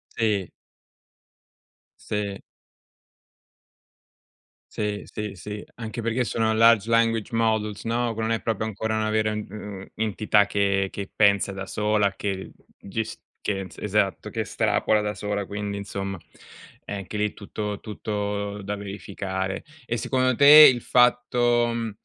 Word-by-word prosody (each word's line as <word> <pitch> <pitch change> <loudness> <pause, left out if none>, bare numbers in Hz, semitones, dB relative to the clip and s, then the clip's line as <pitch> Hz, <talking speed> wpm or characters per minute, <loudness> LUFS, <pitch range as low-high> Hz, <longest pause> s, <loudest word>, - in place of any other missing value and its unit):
Sì. 105 -5 0 1.5
Se. 100 -2 -3 2.3
Sì, 105 -1 -2
sì, 105 -1 -5
sì, 105 +4 -7
anche 115 0 -5
perché 115 +2 0
sono 110 -1 +1
large 115 -1 +5
language 115 -1 +2
models 110 -2 0
no, 115 0 0
che 110 - -8
non 110 +1 0
è 115 - 0
proprio 110 -1 -1
ancora 110 +1 -2
una 110 0 0
vera, 110 0 +1
u - - -3
uhm, 100 -1 -8
entità 105 -1 +2
che 100 -1 +1
che 100 -1 -6
pensa 100 -1 +3
da 95 0 -5
sola, 105 0 +1
che, 95 -2 -4 0.3
ges 110 +3 -4 0.2
che 100 -2 -1
ens 95 -1 -8
esatto, 105 0 0
che 110 - -3
estrapola 110 0 +1
da 105 0 -2
sola, 100 +1 -3
quindi 100 0 -4
insomma, 100 -1 -4 0.7
è - - -10
anche 100 +1 -6
lì 105 0 0
tutto 105 0 -5
tutto 105 -1 -4
da 100 +1 -3
verificare. 95 -1 -4 0.2
E 120 - -2
secondo 130 +2 +1
te 150 +3 +10
il 120 - -5
fatto, 120 -1 +3
mhmm, 115 -1 -3
105 Hz, 140 wpm, -25 LUFS, 100-115 Hz, 2.3 s, te